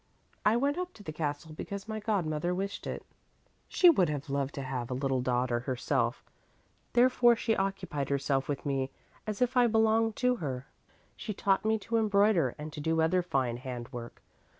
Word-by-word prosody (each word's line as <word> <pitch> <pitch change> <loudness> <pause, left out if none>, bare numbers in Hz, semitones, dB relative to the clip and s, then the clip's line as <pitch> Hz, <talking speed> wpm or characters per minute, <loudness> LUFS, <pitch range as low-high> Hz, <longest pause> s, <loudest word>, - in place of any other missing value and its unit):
"I 215 +2 +4
went 285 +6 +1
up 360 0 -4
to 205 - -13
the 155 - -5
castle 155 0 -3
because 200 +5 -6
my 220 -1 -3
godmother 175 -5 -1
wished 195 +2 -4
it. - - -5 0.6
She 360 - +4
would 190 - +5
have 145 -1 -4
loved 140 0 -1
to 140 - -4
have 130 -2 -4
a 125 - -2
little 135 -1 0
daughter 125 -1 +1
herself, 125 -1 -1 0.7
therefore 240 -1 +5
she 225 0 0
occupied 195 -7 -2
herself 140 -1 0
with 145 0 -3
me 135 -2 0 0.4
as 215 +2 0
if 250 +1 -1
I 245 -1 +5
belonged 225 0 +3
to 250 -1 +2
her. 135 - -4 0.5
She 210 - -5
taught 195 +1 +1
me 220 0 +3
to 230 +3 -2
embroider 200 - +3
and 150 0 -7
to 150 - -6
do 160 +2 +1
other 165 +3 +3
fine 130 -8 -1
handwork. 120 -1 -7
160 Hz, 180 wpm, -30 LUFS, 135-220 Hz, 0.7 s, would